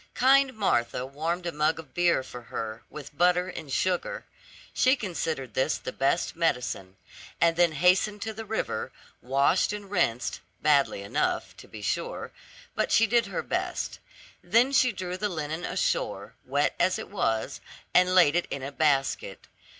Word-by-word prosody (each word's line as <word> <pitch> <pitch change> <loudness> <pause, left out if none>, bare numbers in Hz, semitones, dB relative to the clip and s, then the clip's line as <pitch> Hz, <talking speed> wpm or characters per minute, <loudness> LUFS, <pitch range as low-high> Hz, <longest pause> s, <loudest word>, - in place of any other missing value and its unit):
Kind 270 0 +4
Martha 125 - 0
warmed 165 +6 -3
a 170 - -1
mug 155 +1 +1
of 160 -4 -11
beer 175 -6 +2
for 125 -1 -9
her, 115 -1 -6
with 150 -1 -10
butter 180 +2 +3
and 160 -5 -8
sugar 180 +5 -1 0.5
she 255 +2 +4
considered 160 - -3
this 130 +4 +1
the - - -6
best 135 +5 0
medicine 125 - -1 0.4
and 170 -1 +4
then 170 -1 +3
hastened 180 +6 +3
to 220 +1 -4
the 225 +1 -7
river, 220 - -3 0.3
washed 140 +10 +2
and 205 -1 -7
rinsed, 125 - 0 0.2
badly 140 -9 +2
enough, 100 - -1
to - - -13
be 105 -1 -10
sure, - - -3 0.4
but - - -1
she 225 - +5
did 235 +2 +2
her - - -3
best. - - -3 0.4
Then 230 +9 +3
she 255 -2 +4
drew 185 -2 -5
the 210 +2 -1
linen 160 -1 -4
ashore, - - -1
wet - - +1
as - - +3
it - - -7
was, 110 0 -1 0.3
and 180 0 +4
laid 170 -4 +6
it 175 - +1
in 140 - -4
a 135 - -4
basket. 140 -2 0
170 Hz, 165 wpm, -27 LUFS, 135-185 Hz, 0.5 s, laid